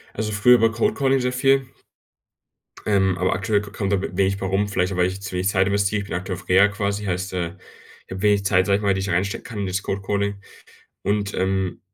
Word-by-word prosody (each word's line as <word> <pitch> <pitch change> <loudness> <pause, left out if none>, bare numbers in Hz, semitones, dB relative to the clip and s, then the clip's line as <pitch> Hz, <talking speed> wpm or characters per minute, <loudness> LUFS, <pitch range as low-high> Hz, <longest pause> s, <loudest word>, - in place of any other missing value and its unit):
Also 110 0 -2
früher 115 +4 +5
über 115 -1 +3
Cold 115 +1 0
Calling 135 -1 +2
sehr 125 0 -1
viel 135 0 +2 1.2
ähm, 95 -3 +2
aber 95 0 +1
aktuell 100 +2 0
k 100 -1 -10
kommt 100 -2 -3
da 100 - +2
wenig 95 +1 0
bei 95 - -4
rum 100 +2 0
vielleicht 95 -1 -1
auch, - - -5
weil 90 0 +3
ich 95 +1 -6
zu 95 -1 -7
wenig 90 +1 0
Zeit 95 -1 +2
investiere. 100 +1 +1
Ich - - -11
bin - - -4
aktuell 90 0 -4
auf 90 - -14
Reha 95 +3 +6
quasi, 105 0 -3
heißt, 95 0 -3
äh, 85 0 -3 0.5
ich - - -21
habe 95 +1 -5
wenig 105 -1 +2
Zeit, 95 -2 +3
sage 100 -1 +3
ich - - -6
mal, 100 -1 +2
die 95 - -2
ich 95 - -2
da - - -2
reinstecken 100 +5 -1
kann 110 -4 -7
in 100 - -2
das 95 +1 -2
Cold 100 0 -3
Calling 100 0 -1 0.7
und, 100 -1 -1
ähm, 95 0 -1
100 Hz, 250 wpm, -22 LUFS, 95-105 Hz, 1.2 s, Reha